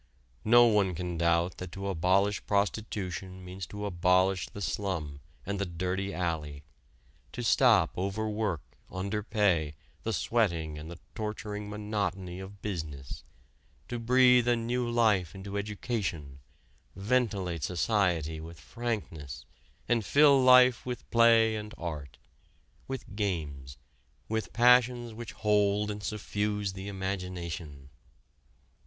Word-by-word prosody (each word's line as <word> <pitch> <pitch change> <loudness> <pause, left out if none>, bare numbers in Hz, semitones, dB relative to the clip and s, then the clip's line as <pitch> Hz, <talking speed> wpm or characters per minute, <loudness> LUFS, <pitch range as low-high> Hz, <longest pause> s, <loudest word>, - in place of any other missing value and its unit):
No 120 +2 +7
one 105 -5 +2
can 90 +1 -4
doubt 85 +1 +1
that 90 -1 -7
to 100 +1 -5
abolish 95 +3 +2
prostitution 95 -3 -2
means 90 +1 -7
to 105 0 -6
abolish 95 0 +2
the - - -9
slum 85 -8 -3 0.3
and 100 0 -3
the 100 - 0
dirty 90 +3 -2
alley, 75 -6 -3 0.7
to - - -4
stop - - +4
overwork, 105 -2 -2 0.3
underpay, 100 -5 0 0.3
the - - -2
sweating 85 -10 0
and 80 +2 -8
the 85 - -8 0.2
torturing 105 -1 -5
monotony 100 -3 -3
of 95 +1 -10
business, 80 -9 -5 0.7
to 120 - -3
breathe 125 +1 +5
a 120 - +4
new 120 +1 -1
life 105 -8 +2
into 100 +1 -7
education, 100 - -3 0.6
ventilate 100 -6 0
society 85 -2 0
with 80 +1 -10
frankness, 80 - -5 0.4
and 120 -2 +2
fill 140 +4 +5
life 125 -1 +6
with 125 -1 -6
play 115 -1 +5
and 105 0 -6
art, 75 -6 -6 0.7
with 130 -6 -6
games, 75 -10 -3 0.5
with 110 0 -2
passions 120 -1 +4
which 115 +1 -8
hold 105 0 +2
and 105 0 -6
suffuse 105 -1 -2
the 95 +1 -7
imagination. 90 -7 -5
100 Hz, 120 wpm, -29 LUFS, 85-110 Hz, 0.7 s, No